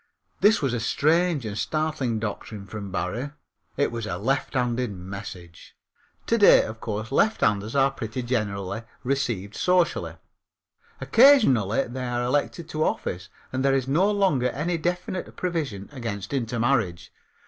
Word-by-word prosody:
This 210 -4 +4
was 135 -3 +1
a 120 - 0
strange 155 +4 +2
and 105 -2 -4
startling 155 -2 -1
doctrine 105 -1 -5
from 100 -1 -7
Barrie. 100 +10 -2 0.5
It 145 - +1
was 115 -2 -4
a 85 - -3
lefthanded 125 +1 0
message. 90 -2 -9 0.5
To 230 - +1
day, 205 - +7
of 110 0 -7
course, 110 +1 -4
lefthanders 110 - +2
are 135 0 +4
pretty 125 -1 -5
generally 105 -4 -2 0.2
received 120 -7 -1
socially; 180 -1 +1 0.8
occasionally 135 - +5
they 130 +2 -6
are 120 0 -1
elected 145 +6 -1
to 155 -1 -1
office, 90 - -2 0.2
and 130 0 -1
there 135 0 +3
is 130 -1 0
no 170 +9 +3
longer 185 -12 +2
any 165 +4 -2
definite 180 +2 -3
provision 150 - -3
against 115 -5 -5
intermarriage. 115 -7 0
125 Hz, 135 wpm, -25 LUFS, 105-155 Hz, 0.8 s, day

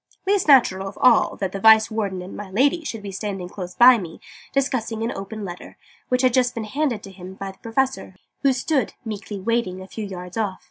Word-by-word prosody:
least 395 -2 +1
natural 195 -9 +5
of 195 - -9
all 245 -3 +4
that 190 -2 -3
the 195 - -5
Vice 220 +2 +6
Warden 200 -4 -2
and 185 - -9
'my 205 -2 -7
Lady' 275 - +2
should 225 -8 -6
be 200 - -6
standing 195 -2 -4
close 180 -1 -8
beside 245 -2 +7
me, 165 -3 -9 0.3
discussing 240 -5 -1
an 230 - -1
open 200 +2 -6
letter, 175 -1 -9 0.3
which 250 +1 +1
had 255 -2 +4
just 250 -1 +2
been 225 - -3
handed 240 -1 -2
to 195 - -10
him 185 0 -10
by 195 0 -6
the 190 - -22
Professor, 255 -4 -2 0.3
who 275 - +4
stood, 260 -1 -1
meekly 210 -2 -6
waiting, 195 -3 -1
a 185 - -9
few 220 +3 -6
yards 180 0 -8
off. 205 -4 -1
215 Hz, 220 wpm, -22 LUFS, 190-250 Hz, 0.3 s, beside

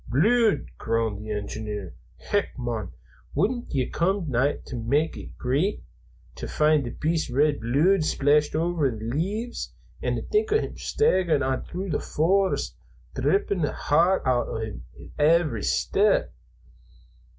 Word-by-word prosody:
"Bluid!" 210 - +3
groaned 110 -2 -1
the 110 - -8
engineer. 105 -2 -5 0.2
"Hech, 205 -7 -2
mon, 115 -6 -3 0.4
wouldna 240 +4 0
that 130 -3 -1
come 180 +1 0
nigh 135 +4 +2
to - - -7
mak' 140 +7 0
ye - - -10
greet, 145 +11 0 0.5
to - - -7
find 150 -2 +2
the - - -3
beast's 160 +3 -1
red 145 +3 +2
bluid 155 +11 +3
splashed 150 0 +2
over 165 -3 +1
the 115 - -5
leaves, 195 - -3 0.3
and - - -2
think 435 0 +2
o' 435 - +5
him - - -4
staggerin' 180 - +1
on 130 0 -1
thro' 185 +2 -5
the 155 - -1
forest, 170 - +1 0.4
drippin' 180 +7 +1
the 150 - 0
heart 170 +6 +2
oot 125 -1 +2
o' - - -4
him 110 - -5
wi' - - -12
every 150 -6 +3
step?" - - +2
150 Hz, 145 wpm, -25 LUFS, 120-185 Hz, 0.5 s, o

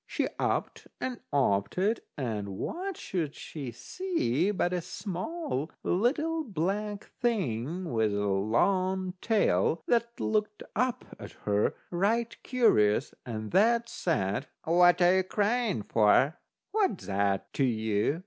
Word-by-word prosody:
She - - -1
upped - - -1
and 255 -2 -3
oped 100 - +1
it, 210 +5 +1
and 105 -7 -3
what 375 - -4
should 160 -6 -3
she 140 -6 -7
see 185 - -1
but 180 -3 0
a 180 - 0
small 185 - -4
little 305 - +1
black 205 - -2 0.2
thing 175 - -1
with 110 -2 +2
a 100 0 -1
long 185 - +1
tail, 165 - +2
that 235 0 0
look 210 -1 -1
up 250 +1 0
at - - -9
her 105 0 +1 0.2
right 220 +6 +1
curious, 110 - +3
and 110 -2 -5
that 230 +3 +3
said: 105 - -1 0.2
"What 175 +2 +5
are 175 +1 +6
you 190 - +4
a - - +1
crying 210 - 0
for?" 115 +9 +3 0.3
"What's 400 - 0
that 100 -1 0
to 140 - +1
you?" 110 +3 +1
180 Hz, 130 wpm, -29 LUFS, -, 0.3 s, are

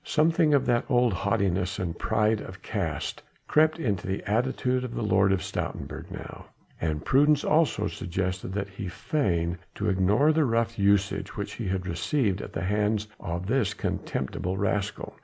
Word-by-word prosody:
Something 160 -1 +3
of 140 - +2
that 120 -1 +2
old 125 -4 +3
haughtiness 95 -1 0
and 85 -3 -3
pride 105 +3 +1
of 95 +1 -10
caste 85 - -3 0.3
crept 155 +1 +4
into 105 - -1
the 95 0 -2
attitude 125 +3 0
of 125 -2 -5
the 120 - -2
Lord 95 -1 +3
of 95 -1 +1
Stoutenburg - - -5
now, - - -9 0.3
and 80 -1 -1
prudence 145 +2 +4
also 150 -9 +2
suggested 95 -1 -3
that 100 0 -2
he 100 +1 -7
should 90 - -5
feign 90 - 0 0.2
to 105 0 -1
ignore 100 +11 +3
the 160 0 +3
rough 115 -3 0
usage 100 0 +1
which - - -4
he - - -4
had 95 -1 -1
received 95 - 0
at - - -7
the - - -3
hands 105 +2 0
of 85 +2 -4
this 115 0 +1
contemptible 90 +8 -3
rascal. 100 +1 -1
100 Hz, 170 wpm, -27 LUFS, 95-125 Hz, 0.3 s, crept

